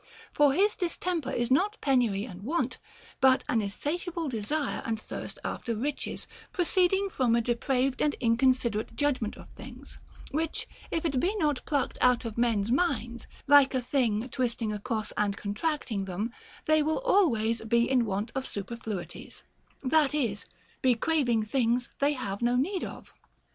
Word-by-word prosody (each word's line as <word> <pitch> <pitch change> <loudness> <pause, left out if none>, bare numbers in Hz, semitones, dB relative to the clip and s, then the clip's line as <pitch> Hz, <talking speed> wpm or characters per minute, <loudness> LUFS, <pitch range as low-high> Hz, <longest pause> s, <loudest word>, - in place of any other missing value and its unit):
For 290 -2 +4
his 405 +7 +3
distemper 345 -4 -1
is 240 -2 -1
not 390 +11 +2
penury 240 -7 +2
and 185 -6 -10
want, 255 +1 -1 0.4
but 265 -1 +5
an 225 - +2
insatiable 320 - -3
desire 270 +6 -2
and 225 -1 -2
thirst - - -7
after 230 - -3
riches, 275 +6 -3 0.3
proceeding 375 +2 +2
from 245 -6 +2
a - - +3
depraved 255 +3 0
and 295 - +2
inconsiderate 235 -2 +1
judgment 260 -7 0
of - - -12
things, - - -11 0.3
which 315 +2 -2 0.2
if 330 0 -2
it 275 -5 +1
be 375 +10 +1
not 300 -9 0
plucked 285 -4 -1
out 250 -1 +4
of 225 -2 -4
men's 230 -3 +1
minds, 240 -6 0 0.2
like 280 -2 +6
a 255 - +1
thing 240 -3 +1
twisting 235 -4 -1
across 215 +1 -3
and 205 -1 0
contracting 215 -1 -2
them, 200 +6 -3 0.3
they 310 0 +4
will 310 +8 0
always 235 - +2
be 235 +1 +2
in 255 -2 +3
want 210 +1 -2
of 265 0 -3
superfluities, 200 -4 -6 0.4
that 295 +1 +3
is, 225 -9 -1 0.3
be 255 -2 +4
craving 245 -5 +1
things 240 +1 +1
they 285 +1 +3
have 200 -7 -4
no 240 +1 +2
need 350 +10 0
of. - - -8
255 Hz, 155 wpm, -28 LUFS, 225-295 Hz, 0.4 s, like